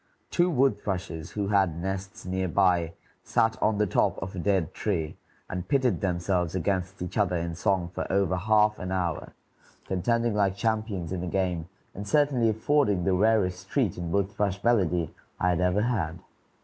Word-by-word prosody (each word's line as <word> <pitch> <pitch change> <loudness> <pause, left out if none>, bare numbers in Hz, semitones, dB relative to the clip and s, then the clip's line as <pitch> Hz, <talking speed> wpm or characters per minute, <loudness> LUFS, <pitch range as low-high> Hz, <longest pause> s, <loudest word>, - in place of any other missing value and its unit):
Two 175 +1 +3
wood 135 -4 +2
thrushes 90 -5 -4
who 100 -2 -2
had 95 -5 +2
nests 95 +1 -5
near 95 0 -1
by 90 -2 +2 0.3
sat 110 0 +1
on 110 -1 +2
the 105 - +3
top 90 - +1
of 95 0 -6
a - - -4
dead 95 -3 +1
tree 80 -7 -2 0.3
and 90 -1 -5
pitted 130 - +2
themselves 90 -2 0
against 95 +1 -1
each 90 +4 -4
other 95 -3 +2
in 85 0 -2
song 90 +1 0
for - - -4
over 95 -2 +2
half 105 +3 +3
an 90 0 -4
hour, 90 -4 -2 0.5
contending 115 +5 0
like 100 -2 +1
champions 110 -5 -2
in 95 -2 -2
a - - -3
game, 90 -2 -1 0.2
and 100 +2 -7
certainly 135 -3 +3
affording 110 -3 +2
the 95 - +2
rarest 95 -2 +1
treat 125 - +1
in 85 -1 -4
wood 100 +1 +1
thrush 100 -1 -2
melody 90 -8 +2 0.3
I 90 - +2
had 90 0 +1
ever 90 +3 +2
had. 90 -9 -1
95 Hz, 175 wpm, -27 LUFS, 90-105 Hz, 0.5 s, Two